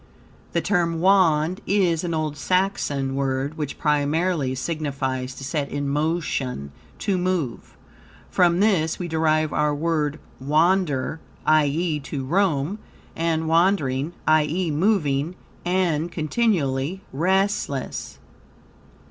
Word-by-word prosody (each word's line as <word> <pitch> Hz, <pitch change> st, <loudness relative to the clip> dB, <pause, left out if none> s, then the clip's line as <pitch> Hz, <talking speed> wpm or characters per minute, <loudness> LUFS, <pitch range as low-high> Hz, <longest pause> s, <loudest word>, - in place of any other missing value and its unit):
The -, -, +1 dB
term 170 Hz, -4 st, +1 dB
Wand 180 Hz, -2 st, +3 dB
is 185 Hz, -5 st, +2 dB
an 170 Hz, -2 st, -1 dB
old 155 Hz, -2 st, -2 dB
Saxon 145 Hz, -6 st, 0 dB
word, 135 Hz, +2 st, -1 dB
which 150 Hz, -3 st, -4 dB
primarily 150 Hz, -1 st, +1 dB
signifies 130 Hz, -3 st, -3 dB
to -, -, -9 dB
set 140 Hz, +1 st, -2 dB
in 145 Hz, 0 st, -3 dB
motion, 140 Hz, -, -1 dB, 0.3 s
to 190 Hz, -3 st, 0 dB
move. 180 Hz, -9 st, -2 dB, 0.5 s
From 175 Hz, 0 st, +3 dB
this 180 Hz, -7 st, +2 dB
we 180 Hz, -, -4 dB
derive 155 Hz, -1 st, +1 dB
our 150 Hz, -1 st, +1 dB
word 155 Hz, -1 st, -1 dB, 0.2 s
wander, 155 Hz, 0 st, +1 dB, 0.3 s
i.e., 155 Hz, +1 st, +2 dB
to 135 Hz, -1 st, -5 dB
roam, 175 Hz, +2 st, +1 dB, 0.4 s
and 160 Hz, -1 st, 0 dB
wandering, 160 Hz, -4 st, +2 dB
i.e., 155 Hz, +3 st, +2 dB
moving 155 Hz, -3 st, +1 dB, 0.3 s
and 175 Hz, -3 st, 0 dB
continually 160 Hz, -, 0 dB
restless. 185 Hz, -3 st, -1 dB
155 Hz, 105 wpm, -23 LUFS, 140-180 Hz, 0.5 s, Wand